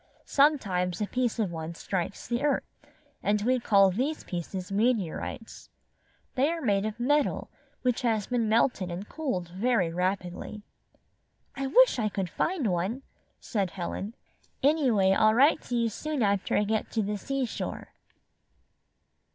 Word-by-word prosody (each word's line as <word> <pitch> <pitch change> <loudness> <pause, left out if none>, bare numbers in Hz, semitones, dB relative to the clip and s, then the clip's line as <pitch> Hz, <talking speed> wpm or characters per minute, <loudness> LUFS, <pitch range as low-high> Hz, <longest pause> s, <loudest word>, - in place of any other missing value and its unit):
Sometimes 195 - +2
a 210 - 0
piece 250 +2 -1
of 210 -6 0
one 165 0 -5
strikes 190 +2 -3
the 240 +2 -1
earth, 290 -1 +1 0.6
and 210 +1 +1
we 255 +2 +2
call 200 -4 +5
these 270 - -2
pieces 180 +2 -5
meteorites. 220 0 -2 0.6
They 275 +3 +2
are 335 0 -2
made 205 -7 +1
of 215 +2 -6
metal 290 +4 +1 0.3
which 250 -1 +1
has 225 -5 +1
been 235 -3 0
melted 220 -4 +2
and 180 +4 -5
cooled 255 - -3
very 190 -2 +1
rapidly." 185 +3 -3 0.9
"I 275 0 -2
wish - - +5
I 215 -2 +1
could 190 -4 -3
find 335 -7 -1
one," 190 +10 -2 0.4
said 200 -5 -1
Helen. 195 +5 -5 0.5
"Anyway 260 -10 +4
I'll 215 +3 +4
write 285 +6 +5
to 245 - -3
you 235 -1 +2
soon 290 +4 -2
after 200 -1 +1
I 205 - +3
get 215 +1 -1
to 220 - +1
the 205 +1 -2
seashore." 270 0 -3
215 Hz, 145 wpm, -28 LUFS, 190-255 Hz, 0.9 s, call